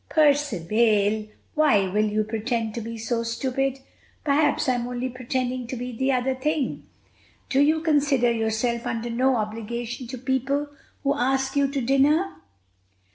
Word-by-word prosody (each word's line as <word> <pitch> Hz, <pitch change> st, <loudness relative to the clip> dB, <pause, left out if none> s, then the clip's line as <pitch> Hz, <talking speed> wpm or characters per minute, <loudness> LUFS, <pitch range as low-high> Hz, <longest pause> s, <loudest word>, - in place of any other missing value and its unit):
"Percivale, 220 Hz, -, +2 dB, 0.3 s
why 270 Hz, -11 st, +3 dB
will 210 Hz, +3 st, +1 dB
you 215 Hz, +1 st, +1 dB
pretend 225 Hz, +1 st, -2 dB
to 235 Hz, -, -4 dB
be 230 Hz, +1 st, -6 dB
so 230 Hz, +1 st, -1 dB
stupid?" 265 Hz, +3 st, -1 dB, 0.4 s
"Perhaps 290 Hz, 0 st, +2 dB
I'm 245 Hz, -1 st, +1 dB
only 250 Hz, +1 st, -3 dB
pretending 255 Hz, 0 st, -3 dB
to 255 Hz, -, -4 dB
be 250 Hz, +1 st, -5 dB
the 265 Hz, +3 st, +1 dB
other 260 Hz, 0 st, +1 dB
thing." 290 Hz, +2 st, -2 dB, 0.6 s
"Do 275 Hz, -, +2 dB
you 310 Hz, +2 st, +3 dB
consider 285 Hz, -6 st, +3 dB
yourself 230 Hz, +2 st, -1 dB
under 235 Hz, 0 st, -3 dB
no 255 Hz, +3 st, +2 dB
obligation 230 Hz, +3 st, -4 dB
to 255 Hz, +2 st, -6 dB
people 270 Hz, +3 st, -1 dB, 0.3 s
who 280 Hz, 0 st, +2 dB
ask 265 Hz, 0 st, 0 dB
you 280 Hz, -1 st, +3 dB
to 275 Hz, 0 st, -2 dB
dinner?" 280 Hz, +8 st, +2 dB
250 Hz, 145 wpm, -25 LUFS, 230-275 Hz, 0.6 s, why